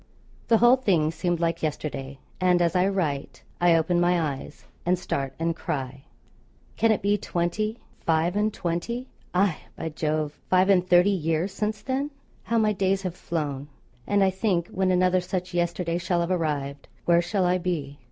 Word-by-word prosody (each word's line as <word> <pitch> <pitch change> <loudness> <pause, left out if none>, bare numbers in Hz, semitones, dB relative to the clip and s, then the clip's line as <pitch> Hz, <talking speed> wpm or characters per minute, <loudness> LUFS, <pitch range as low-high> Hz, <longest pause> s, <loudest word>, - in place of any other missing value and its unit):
The 230 - +5
whole 240 +3 +6
thing 175 -11 +2
seemed 175 0 -1
like 170 0 0
yesterday; 140 -3 -4 0.2
and 180 -1 +3
as 170 +1 +1
I 180 +1 +4
write, 160 -8 -2 0.2
I 175 -1 +5
open 175 +2 +2
my 175 0 +3
eyes 145 -5 -4 0.2
and 180 +1 +2
start 135 -6 -3
and 165 0 -1
cry, 135 -2 -4 0.7
'can 225 - +3
it 210 - 0
be 205 +1 +2
twenty, 210 +7 -1 0.2
five 165 +2 +1
and 210 +1 +2
twenty, 205 +9 -3 0.3
aye, 185 -3 +3 0.2
by 160 - -4
Jove! 155 -1 -2
five 185 +1 +4
and 180 -1 +3
thirty, 180 +3 +6
years 165 0 0
since 210 0 -2
then?' 270 +4 -1 0.3
How 230 - -1
my 215 -1 +3
days 195 0 0
have 185 -3 -2
flown! 145 -6 -3 0.4
And 205 -1 +3
I 190 - +3
think 185 -3 0
when 190 0 0
another 185 0 +3
such 180 0 -4
yesterday 175 0 0
shall 175 0 0
have 170 +2 -1
arrived, 145 -5 -2 0.2
where 170 0 +5
shall 180 +2 0
I 180 +1 +2
be? 155 -6 -3
175 Hz, 175 wpm, -26 LUFS, 160-195 Hz, 0.7 s, whole